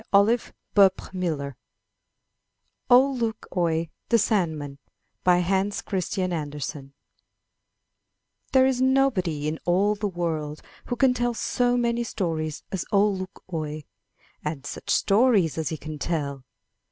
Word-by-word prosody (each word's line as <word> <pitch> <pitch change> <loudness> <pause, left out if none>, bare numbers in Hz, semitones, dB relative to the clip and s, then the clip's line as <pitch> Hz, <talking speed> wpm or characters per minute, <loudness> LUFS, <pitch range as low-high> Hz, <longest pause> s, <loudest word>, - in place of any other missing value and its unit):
131 200 -1 +4 0.2
MY 180 -2 -1
BOOK 155 - -1
HOUSE 140 0 -5 1.4
OLE 265 +2 +6
LUK 230 -2 -2
OIE, 165 -2 0 0.2
THE 235 - +5
SANDMAN 160 -10 0 0.5
Hans 190 +3 +2
Christian 185 -1 -2
Andersen 145 -2 -5 1.6
HERE 260 -1 +6
is 260 -1 +1
nobody 230 - +2
in 155 +1 -2
all 195 +4 +3
the 210 0 -2
world 160 -5 -3 0.2
who 245 - -2
can 250 +1 +4
tell 240 -1 -1
so 245 +1 +1
many 235 0 +1
stories 160 -8 -3
as 190 - -2
Ole 205 0 +3
Luk 185 0 -7
oie! 155 -1 -3 0.6
And 150 -2 -4
such - - -7
stories 200 - +3
as 160 - -1
he 160 - -4
can 155 0 -7
tell 140 -6 -3
185 Hz, 130 wpm, -25 LUFS, 155-225 Hz, 1.6 s, OLE